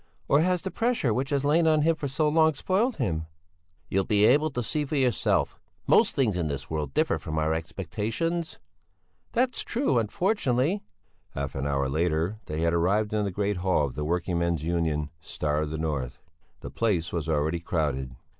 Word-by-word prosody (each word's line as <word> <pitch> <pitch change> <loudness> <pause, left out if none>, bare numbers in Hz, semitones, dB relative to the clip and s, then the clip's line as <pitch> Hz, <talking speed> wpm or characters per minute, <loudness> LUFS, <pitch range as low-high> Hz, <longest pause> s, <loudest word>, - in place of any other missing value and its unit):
Or 140 - +4
has 180 +1 +1
the 190 - -3
pressure 230 - +1
which 130 +4 -1
has 140 -1 0
lain 160 +3 +3
on 155 -1 +4
him 165 +1 +3
for 150 -2 -4
so 150 +3 0
long 160 0 +4
spoiled 210 - +1
him?" 80 - -2 0.6
"You'll 95 +1 +1
be 105 +1 +3
able 150 +7 +4
to 125 -4 -3
see 150 +7 0
for 145 +2 -3
yourself. 130 -4 +1 0.3
Most - - +4
things 120 -8 +2
in 85 -3 0
this 70 -1 -5
world 75 -4 -3
differ - - +2
from 80 0 -5
our 80 0 +1
expectations." 110 - -3 0.8
"That's 250 +1 +1
true, 235 - +1
unfortunately." 150 - 0 0.5
Half 70 0 -3
an 70 +1 -2
hour 70 -1 0
later 80 +7 0
they 75 +1 -3
had 85 0 +2
arrived 100 +6 +1
in 105 -1 +1
the - - -1
great 100 +1 -1
hall 90 -4 +2
of 70 - -5
the 75 - -4
working 85 +2 -1
men's 85 -3 0
union 80 -3 -1
"Star 75 -1 -2
of 75 - -2
the 80 - -4
North." 75 -6 -3 0.4
The - - -7
place 90 -7 0
was 80 -2 -2
already 80 +2 +1
crowded. 70 -6 -2
95 Hz, 190 wpm, -27 LUFS, -, 0.8 s, Or